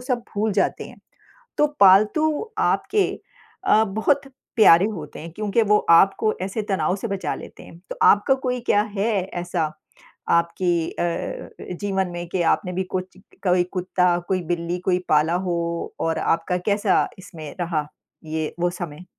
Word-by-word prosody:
सब 250 -1 -2
भूल 210 +1 0
जाते 195 - 0
हैं। - - -13 0.6
तो 300 - +5
पालतू 215 - +4 0.2
आपके 415 -2 +1 0.6
अ, 220 - +4
बहुत 220 +7 +1 0.3
प्यारे 185 -5 +7
होते 150 -5 -8
हैं 165 - -8
क्योंकि 210 +4 0
वो 210 -1 +4
आपको 195 +5 +5
ऐसे 195 +3 -3
तनाव 185 -1 +1
से 215 +4 -5
बचा 195 -2 -2
लेते - - -11
हैं। 165 - -14
तो - - -5
आपका 205 +6 +5
कोई 250 0 -1
क्या 205 - +4
है 200 +3 +1 0.3
ऐसा 170 -3 -1 0.7
आपकी 170 +1 0 0.2
अ, 170 -1 -3 0.3
जीवन 195 -2 -1
में 175 0 -5
कि 175 0 -1
आपने 180 - -2
भी 190 +1 -1
कुछ 185 0 -5
क 195 - -24
कोई 180 0 +3
कुत्ता, 180 -1 +1
कोई 185 -2 0
बिल्ली 170 +1 -2
कोई 180 -1 +3
पाला 155 +2 +3
हो 175 - 0 0.4
और 165 0 0
आपका 165 +2 0
कैसा 205 -1 +2
इसमें 160 -5 -9
रहा 165 -4 -1 0.4
ये 155 0 -3
वो 175 0 +2
समय? 175 -2 -7
185 Hz, 160 wpm, -23 LUFS, 170-210 Hz, 0.7 s, प्यारे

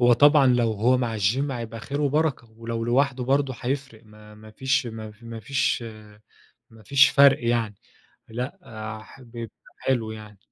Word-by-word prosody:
هو 120 0 +6
طبعًا 145 +2 +6
لو 120 -3 +3
هو 115 +5 +2
مع 115 -3 -2
الgym 125 +9 +1
هيبقى 115 -3 -6
خير 140 +6 -4
وبركة، 145 -4 0
ولو 115 0 -5
لوحده 130 +1 +1
برضه 135 0 +1
هيفرق 130 -3 -4
ما 105 0 -16
ما 110 +1 -14
فيش 130 +3 0
ما 110 -1 -7
ف 105 +2 -20
ما 115 -1 -8
فيش 135 +1 0 0.9
ما 110 -1 -17
فيش 140 +5 +5
فرق 140 -3 +5
يعني. 115 -3 0 0.5
لأ، 125 +10 -5 0.4
ح 125 - -16
بيبقى 115 -2 -9 0.2
حلو 120 -4 -1
يعني. 105 -2 -10
120 Hz, 165 wpm, -24 LUFS, 110-135 Hz, 0.9 s, هو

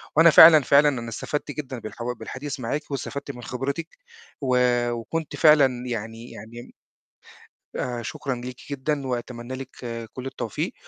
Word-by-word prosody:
وأنا 165 +2 +8
فعلًا، 155 -1 +9
فعلًا 145 +3 +5
أنا 120 -4 -4
استفدت 145 +6 -4
جدًا 135 -4 -6
بالحوا 115 +3 -5
بالحديث 130 +3 -6
معاكِ 145 +6 -4
واستفدت 140 0 -4
من 120 -2 -11
خبرتِك 140 - -4 0.4
و 130 -2 +1 0.4
وكنت 140 +7 -4
فعلًا 135 -6 +5
يعني 115 0 -5
يعني 115 +3 -10
م - - -14 1.0
آآ 120 -1 -3
شكرًا 135 +4 -4
ليكِ 125 +1 -7
جدًا، 140 0 -2
وأتمنّى 120 0 -5
لِك 130 0 -7 0.4
كُلّ 130 - -7
التوفيق، 130 -5 -4
130 Hz, 145 wpm, -24 LUFS, 120-145 Hz, 1.0 s, فعلًا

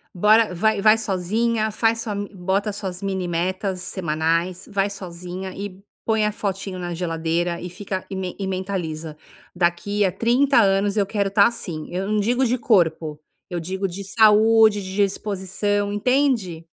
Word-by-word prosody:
Bora, 210 +2 +4
vai 215 +3 +1
vai 215 +1 +6
sozinha, 220 +3 0
faz 225 +1 +1
sua 215 -3 -3
m 205 0 -4
bota 195 +3 -1
suas 190 -3 -6
mini 190 -2 -2
metas 185 +2 -2
semanais, 170 0 -1
vai 200 0 +1
sozinha 185 0 -7
e 195 -1 -7 0.2
põe 220 -1 +2
a 210 - +1
fotinho 195 -2 -4
na 175 -1 -4
geladeira 170 0 -1
e 180 - -5
fica 190 0 -5
e 195 - -5
men 185 -1 -4
e 195 - -2
mentaliza: 175 -5 -4 0.4
"Daqui 180 +4 +1
a 190 - +1
30 245 +5 +3
anos, 200 0 +2
eu 205 -2 +2
quero 200 0 -1
estar 200 +1 +5
assim". 175 -9 -5
Eu 185 +2 -2
não 215 0 +1
digo 245 +5 +1
de 250 +1 +1
corpo. 165 -9 +1 0.3
Eu 175 -2 -3
digo 190 +4 -3
de 195 +1 -4
saúde, 220 0 +5
de 190 0 -7
disposição, 205 0 -1
entende? 215 - +1
195 Hz, 165 wpm, -22 LUFS, 180-210 Hz, 0.4 s, vai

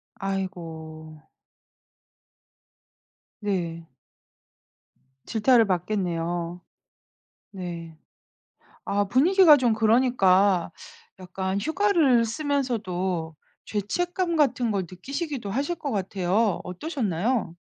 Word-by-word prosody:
아이고. 165 -6 -6 2.2
네. 170 -5 -3 1.4
질타를 230 +1 +4
받겠네요. 175 -2 -2 0.9
네. 170 -4 -7 0.9
아 205 0 +1
분위기가 310 - +6
좀 245 -4 +2
그러니까 205 -6 +3 0.5
약간 190 +1 -3
휴가를 315 - +3
쓰면서도 215 - -2 0.3
죄책감 345 - -2
같은 255 -6 +2
걸 195 -2 0
느끼시기도 270 - -5
하실 285 - -1
것 295 -4 -5
같아요. 195 0 0
어떠셨나요? 210 - -2
200 Hz, 180 characters per minute, -25 LUFS, 180-260 Hz, 2.2 s, 분위기가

